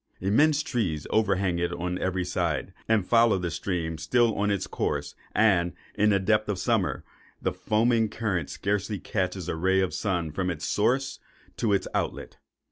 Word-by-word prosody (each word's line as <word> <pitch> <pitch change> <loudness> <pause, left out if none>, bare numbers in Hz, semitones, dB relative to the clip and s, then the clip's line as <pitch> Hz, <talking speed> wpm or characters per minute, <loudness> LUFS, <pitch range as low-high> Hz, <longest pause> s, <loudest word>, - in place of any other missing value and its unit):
Immense 145 +10 +3
trees 100 - -2
overhang 100 -5 +1
it 85 0 0
on 90 +1 -3
every 95 -1 -1
side, - - -1 0.2
and 110 -4 +3
follow 115 -2 +4
the 90 -2 -3
stream 80 -3 -3
still 120 -2 +2
on 105 0 0
in 100 - +3
its 95 - -3
course; - - -2 0.2
and, 95 -6 +3 0.2
in 105 +1 +3
the 100 -2 +3
depth 105 +2 +1
of 100 - 0
summer, 90 - 0 0.4
the - - -1
foaming 115 0 +2
current 100 -9 -2
scarcely 105 +1 -1
catches 95 -1 -2
a 80 - -2
ray 95 +3 +2
of 95 -1 +1
the - - -5
sun 90 -6 -1
from 90 +3 -2
its 85 -4 -4
source 130 +6 +1 0.4
to 115 - +1
its 100 - +1
outlet. - - -3
100 Hz, 180 wpm, -27 LUFS, 90-110 Hz, 0.4 s, follow